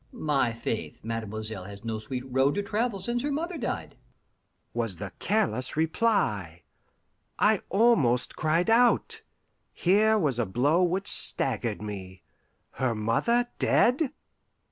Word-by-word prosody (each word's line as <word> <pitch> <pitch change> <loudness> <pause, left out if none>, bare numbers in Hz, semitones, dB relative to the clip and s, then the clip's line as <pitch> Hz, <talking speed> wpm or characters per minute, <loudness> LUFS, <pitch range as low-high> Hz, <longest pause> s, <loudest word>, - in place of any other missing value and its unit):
"My 145 - 0
faith, 115 -1 -5
mademoiselle 110 -3 -5
has 100 +1 -10
no 110 -1 -3
sweet 125 +4 -5
road 135 +2 +1
to 205 - -1
travel 215 +1 -1
since 235 +6 -2
her 290 - -2
mother 335 +5 -3
died," - - -4 0.8
was 115 -5 -1
the 95 +1 -6
careless 165 - 0
reply. 155 - 0 0.7
I 210 -1 +3
almost 185 - +3
cried 165 +6 +1
out. 245 - +3 0.5
Here 215 +4 +3
was 145 - +1
a 115 - 0
blow 140 - +2
which 185 +3 0
staggered 115 - +1
me. 95 -3 -8 0.5
Her 125 -3 -1
mother 235 - +1
dead! 260 +3 +3
140 Hz, 125 wpm, -27 LUFS, -, 0.8 s, I